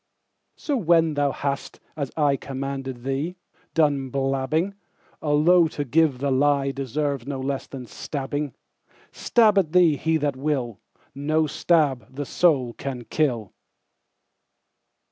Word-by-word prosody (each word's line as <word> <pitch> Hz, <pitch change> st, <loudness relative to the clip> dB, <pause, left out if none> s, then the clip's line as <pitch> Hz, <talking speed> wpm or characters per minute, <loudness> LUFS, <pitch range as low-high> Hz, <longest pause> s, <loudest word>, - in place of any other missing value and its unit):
So 290 Hz, -, -2 dB
when 165 Hz, -5 st, +3 dB
thou 145 Hz, -1 st, +1 dB
hast, 140 Hz, 0 st, -4 dB, 0.2 s
as 140 Hz, -4 st, -3 dB
ICommanded 135 Hz, -3 st, -2 dB
thee, 140 Hz, +7 st, -2 dB, 0.4 s
done 145 Hz, -4 st, +2 dB
blabbing,—Although 155 Hz, +3 st, +1 dB
to 145 Hz, -2 st, -4 dB
give 150 Hz, 0 st, +2 dB
the 140 Hz, +2 st, -1 dB
lieDeserves 140 Hz, -1 st, 0 dB
no 140 Hz, -2 st, -3 dB
less 135 Hz, +1 st, -3 dB
than 130 Hz, -2 st, -8 dB
stabbing,—Stab 145 Hz, -, -1 dB
at 160 Hz, -5 st, -1 dB
thee 170 Hz, -5 st, +5 dB
he 160 Hz, +2 st, +1 dB
that 145 Hz, -3 st, -1 dB
will, 130 Hz, -6 st, -2 dB, 0.3 s
No 155 Hz, +3 st, +1 dB
stab 140 Hz, -7 st, +1 dB
the 145 Hz, +1 st, -3 dB
soul 135 Hz, -7 st, +2 dB
can 130 Hz, -2 st, -5 dB
kill. 120 Hz, -7 st, -1 dB
140 Hz, 110 wpm, -24 LUFS, 135-155 Hz, 0.4 s, thee